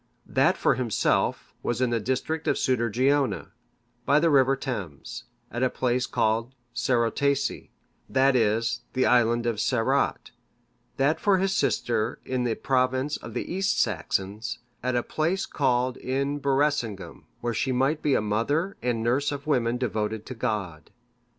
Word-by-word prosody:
That -, -, +2 dB
for -, -, +3 dB
himself 120 Hz, -4 st, 0 dB
was 120 Hz, -1 st, -2 dB
in 130 Hz, -2 st, +1 dB
the 115 Hz, -, +1 dB
district 130 Hz, +8 st, -2 dB
of -, -, +3 dB
Sudergeona, 130 Hz, +3 st, +1 dB, 0.5 s
by 145 Hz, +2 st, +4 dB
the 165 Hz, +1 st, +3 dB
river 135 Hz, -1 st, +5 dB
Thames, 100 Hz, -, -6 dB, 0.3 s
at 120 Hz, -, -3 dB
a 130 Hz, -, +3 dB
place 125 Hz, 0 st, 0 dB
called 115 Hz, +4 st, 0 dB, 0.2 s
Cerotaesei,(582) 125 Hz, +3 st, 0 dB, 0.4 s
that 135 Hz, 0 st, +3 dB
is, 115 Hz, 0 st, +1 dB
the 130 Hz, -, +2 dB
Island 120 Hz, -1 st, +3 dB
of 115 Hz, -3 st, -1 dB
Cerot; 130 Hz, +4 st, 0 dB, 0.7 s
that 145 Hz, +4 st, +2 dB
for 200 Hz, -2 st, +3 dB
his 190 Hz, +1 st, +1 dB
sister 115 Hz, 0 st, 0 dB
in 130 Hz, -1 st, -1 dB
the 115 Hz, -2 st, 0 dB
province 130 Hz, +2 st, 0 dB
of -, -, -10 dB
the -, -, -3 dB
East 190 Hz, +1 st, +1 dB
Saxons, 105 Hz, +2 st, -1 dB, 0.2 s
at 125 Hz, 0 st, -1 dB
a 120 Hz, -, +1 dB
place 170 Hz, +5 st, -1 dB
called 130 Hz, -2 st, 0 dB
In 140 Hz, +2 st, -2 dB
Berecingum,(583) 135 Hz, -7 st, -1 dB, 0.2 s
wherein 120 Hz, 0 st, -1 dB
she 130 Hz, -, 0 dB
might 135 Hz, +5 st, +1 dB
be 140 Hz, -3 st, +2 dB
a -, -, +2 dB
mother 130 Hz, -, 0 dB
and 120 Hz, -2 st, -1 dB
nurse 130 Hz, +6 st, +1 dB
of 140 Hz, -1 st, -5 dB
women 125 Hz, -5 st, +1 dB
devoted 110 Hz, -3 st, -2 dB
to -, -, -6 dB
God. 95 Hz, -9 st, -3 dB
125 Hz, 150 wpm, -26 LUFS, 115-140 Hz, 0.7 s, river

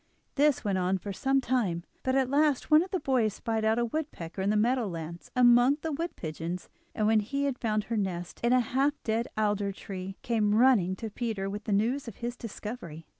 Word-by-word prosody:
This 290 Hz, -1 st, +3 dB
went 195 Hz, -3 st, 0 dB
on 185 Hz, +1 st, +1 dB
for 200 Hz, +2 st, -6 dB
some 270 Hz, +7 st, +1 dB
time, 220 Hz, -10 st, 0 dB, 0.2 s
but 260 Hz, 0 st, 0 dB
at 265 Hz, -1 st, +3 dB
last 290 Hz, +1 st, +1 dB
one 305 Hz, +1 st, +8 dB
of 365 Hz, -, -4 dB
the 375 Hz, -, -1 dB
boys 250 Hz, -, +1 dB
spied 225 Hz, -2 st, -2 dB
out 220 Hz, +1 st, +2 dB
a 240 Hz, -, +2 dB
woodpecker 225 Hz, -, -4 dB
in 195 Hz, -, +1 dB
the 210 Hz, -, +2 dB
meadow 240 Hz, +2 st, +2 dB
lands 170 Hz, -1 st, -7 dB
among 245 Hz, +2 st, +6 dB
the 320 Hz, -, -1 dB
wood 330 Hz, +4 st, -3 dB
pigeons, 165 Hz, +2 st, -5 dB, 0.3 s
and 215 Hz, -, +1 dB
when 220 Hz, 0 st, +4 dB
he 275 Hz, +7 st, -2 dB
had 275 Hz, -3 st, -1 dB
found 215 Hz, -2 st, 0 dB
her 230 Hz, +1 st, -3 dB
nest 180 Hz, -4 st, -3 dB
in 235 Hz, -, +2 dB
a 255 Hz, 0 st, +5 dB
half 270 Hz, +5 st, +1 dB
dead 225 Hz, +1 st, 0 dB
alder 205 Hz, -2 st, +1 dB
tree, 190 Hz, 0 st, -7 dB
came 215 Hz, -4 st, +1 dB
running 220 Hz, -7 st, +4 dB
to 220 Hz, +1 st, -6 dB
Peter 215 Hz, -4 st, -3 dB
with 205 Hz, +1 st, -6 dB
the -, -, -2 dB
news 235 Hz, +7 st, +1 dB
of 225 Hz, -, -7 dB
his 240 Hz, +1 st, -4 dB
discovery. 210 Hz, -8 st, -7 dB
225 Hz, 220 wpm, -29 LUFS, 195-260 Hz, 0.3 s, one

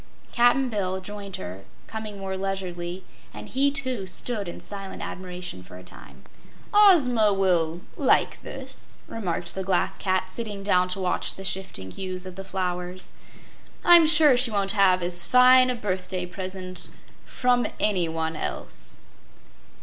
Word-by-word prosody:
Cap'n 245 Hz, +2 st, +4 dB
Bill 190 Hz, -5 st, -2 dB
joined 200 Hz, 0 st, -7 dB
her, 90 Hz, +2 st, -7 dB, 0.2 s
coming 220 Hz, -2 st, -7 dB
more 190 Hz, -1 st, -4 dB
leisurely, 185 Hz, -2 st, -4 dB, 0.3 s
and -, -, -8 dB
he, 275 Hz, +2 st, +2 dB
too, 260 Hz, -8 st, -2 dB
stood 205 Hz, +2 st, -3 dB
in 175 Hz, -, -7 dB
silent 195 Hz, -1 st, -8 dB
admiration 180 Hz, -, -7 dB
for 90 Hz, -, -12 dB
a 90 Hz, -, -12 dB
time. -, -, -13 dB, 0.5 s
"Ozma 275 Hz, -, +6 dB
will 175 Hz, -4 st, +1 dB, 0.2 s
like -, -, +2 dB
this," -, -, -8 dB
remarked 180 Hz, -5 st, -3 dB
the 190 Hz, -, -3 dB
Glass 185 Hz, -1 st, 0 dB
Cat, 185 Hz, -1 st, 0 dB
sitting 205 Hz, -1 st, -5 dB
down 180 Hz, -2 st, +3 dB
to 180 Hz, +2 st, -4 dB
watch 185 Hz, -1 st, -1 dB
the 195 Hz, -, -8 dB
shifting 185 Hz, -, -4 dB
hues 185 Hz, -, -4 dB
of 185 Hz, -1 st, -8 dB
the 195 Hz, -, -7 dB
flowers. 180 Hz, -1 st, -4 dB, 0.7 s
"I'm 345 Hz, -2 st, +8 dB
sure 305 Hz, -4 st, +6 dB
she 245 Hz, 0 st, +4 dB
won't 200 Hz, -2 st, 0 dB
have 190 Hz, -3 st, +4 dB
as 175 Hz, 0 st, +1 dB
fine 255 Hz, +3 st, +6 dB
a 250 Hz, -, 0 dB
birthday 185 Hz, -4 st, -3 dB
present 185 Hz, 0 st, -4 dB, 0.3 s
from 245 Hz, -2 st, +1 dB
anyone 165 Hz, -5 st, 0 dB
else." -, -, -6 dB
190 Hz, 145 wpm, -25 LUFS, 180-220 Hz, 0.7 s, I'm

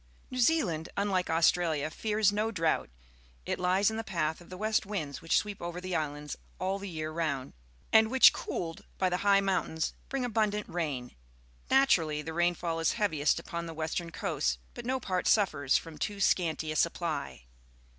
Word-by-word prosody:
New 255 Hz, -, -4 dB
Zealand, 225 Hz, -, +2 dB
unlike 195 Hz, -3 st, 0 dB
Australia, 160 Hz, -2 st, +2 dB
fears 215 Hz, 0 st, +1 dB
no 210 Hz, +2 st, 0 dB
drought; 165 Hz, -7 st, 0 dB, 0.6 s
it -, -, -2 dB
hes 185 Hz, +3 st, +3 dB
in 220 Hz, -, -4 dB
the 225 Hz, -, -2 dB
p 190 Hz, -, -9 dB
ath 160 Hz, 0 st, 0 dB
of 175 Hz, -, -15 dB
tbp 185 Hz, -, -8 dB
wp.^t 215 Hz, +2 st, +1 dB
winds 155 Hz, -9 st, -4 dB
which 165 Hz, -, +2 dB
sweep 205 Hz, -2 st, -2 dB
over 175 Hz, +1 st, -4 dB
the 185 Hz, 0 st, -4 dB
islands 150 Hz, -2 st, -3 dB, 0.2 s
all 195 Hz, +1 st, -1 dB
the 200 Hz, 0 st, -6 dB
year 155 Hz, -2 st, -4 dB
round, 155 Hz, -5 st, -2 dB, 0.4 s
and 220 Hz, 0 st, +7 dB
wliich, 260 Hz, +1 st, +7 dB
cooled 165 Hz, -2 st, -4 dB
by 185 Hz, -, +2 dB
the 180 Hz, -, 0 dB
high 200 Hz, +1 st, +4 dB
mountains, 185 Hz, -4 st, -1 dB, 0.2 s
br 275 Hz, -, -2 dB
ing 255 Hz, -, -1 dB
abundant 210 Hz, -3 st, 0 dB
rain. 145 Hz, -8 st, -3 dB, 0.6 s
Naturally, 165 Hz, -, +3 dB
the 160 Hz, -, -5 dB
niiiilull 170 Hz, 0 st, 0 dB
IS 165 Hz, -, +2 dB
heaviest 160 Hz, -10 st, +1 dB
upon 170 Hz, 0 st, -5 dB
the 165 Hz, -, -7 dB
wester 160 Hz, +2 st, -2 dB
n 170 Hz, -, -8 dB
coa^, 60 Hz, -, -1 dB, 0.2 s
but 240 Hz, 0 st, -8 dB
no 260 Hz, +1 st, 0 dB
part 185 Hz, -6 st, -1 dB
suffers 150 Hz, -10 st, +3 dB
from 165 Hz, -2 st, -8 dB
too 205 Hz, -1 st, -3 dB
scanty 160 Hz, -5 st, +1 dB
a -, -, -3 dB
supply. 160 Hz, -, -1 dB
175 Hz, 185 wpm, -30 LUFS, 160-205 Hz, 0.6 s, and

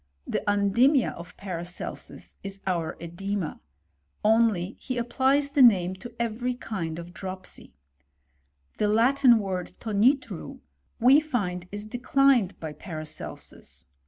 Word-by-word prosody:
The -, -, -2 dB
undimia 220 Hz, +7 st, +3 dB
of 175 Hz, +1 st, -11 dB
Patacetetit 180 Hz, -2 st, -7 dB
is 195 Hz, 0 st, -6 dB
our 170 Hz, -4 st, -1 dB
cedema; 175 Hz, +1 st, -4 dB, 0.7 s
only 215 Hz, -4 st, +3 dB
he 255 Hz, -2 st, -4 dB
applies 265 Hz, +4 st, +1 dB
the 280 Hz, -, +3 dB
name 190 Hz, -7 st, +6 dB
to 240 Hz, +5 st, -9 dB
every 235 Hz, +2 st, -1 dB
kind 170 Hz, -10 st, -4 dB
of 170 Hz, +1 st, -9 dB
dropsy. 185 Hz, -, -7 dB, 1.0 s
The 210 Hz, -, +2 dB
Latin 240 Hz, +3 st, +5 dB
word 190 Hz, -4 st, -3 dB
tonitru, 225 Hz, -, +1 dB, 0.4 s
we 260 Hz, +5 st, +7 dB
find 200 Hz, -, -2 dB
is 205 Hz, +1 st, -6 dB
declined 245 Hz, -2 st, +2 dB
by 160 Hz, -2 st, -5 dB
Paracelsus. 155 Hz, -1 st, -8 dB
205 Hz, 115 wpm, -26 LUFS, 180-245 Hz, 1.0 s, we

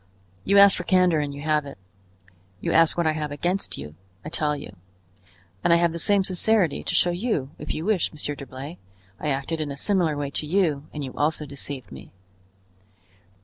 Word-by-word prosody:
"You 200 Hz, +1 st, +3 dB
asked 200 Hz, 0 st, +8 dB
for 180 Hz, -, -3 dB
candor 180 Hz, -3 st, +3 dB
and 145 Hz, -1 st, -2 dB
you 140 Hz, 0 st, -8 dB
have 155 Hz, -1 st, +2 dB
it. 140 Hz, -, -9 dB, 0.8 s
You -, -, -2 dB
ask 165 Hz, 0 st, +4 dB
what 170 Hz, -, +1 dB
I 155 Hz, -, +4 dB
have 155 Hz, -1 st, -3 dB
against 175 Hz, +7 st, -2 dB
you; 75 Hz, +2 st, -8 dB, 0.3 s
I -, -, -4 dB
tell 150 Hz, -2 st, 0 dB
you. 125 Hz, -8 st, -9 dB, 0.9 s
And -, -, +3 dB
I -, -, +8 dB
have 170 Hz, 0 st, +3 dB
the 170 Hz, -, -5 dB
same 200 Hz, +3 st, +3 dB
sincerity 185 Hz, -2 st, +1 dB
to -, -, -2 dB
show 175 Hz, -, +4 dB
you, 175 Hz, -, -2 dB
if -, -, -5 dB
you 160 Hz, -, -4 dB
wish, 210 Hz, -6 st, +1 dB
Monsieur 150 Hz, -1 st, -3 dB
d'Herblay; 140 Hz, +4 st, -8 dB, 0.4 s
I -, -, -4 dB
acted 140 Hz, +4 st, -2 dB
in 150 Hz, -, -2 dB
a 140 Hz, -, -6 dB
similar 170 Hz, -3 st, +1 dB
way 145 Hz, -1 st, -3 dB
to 150 Hz, -, -3 dB
you 155 Hz, -5 st, +1 dB
and 150 Hz, -, -5 dB
you 130 Hz, -, -6 dB
also 150 Hz, +1 st, 0 dB
deceived 140 Hz, -5 st, -6 dB
me." 65 Hz, -1 st, -11 dB
155 Hz, 200 wpm, -25 LUFS, 145-175 Hz, 0.9 s, asked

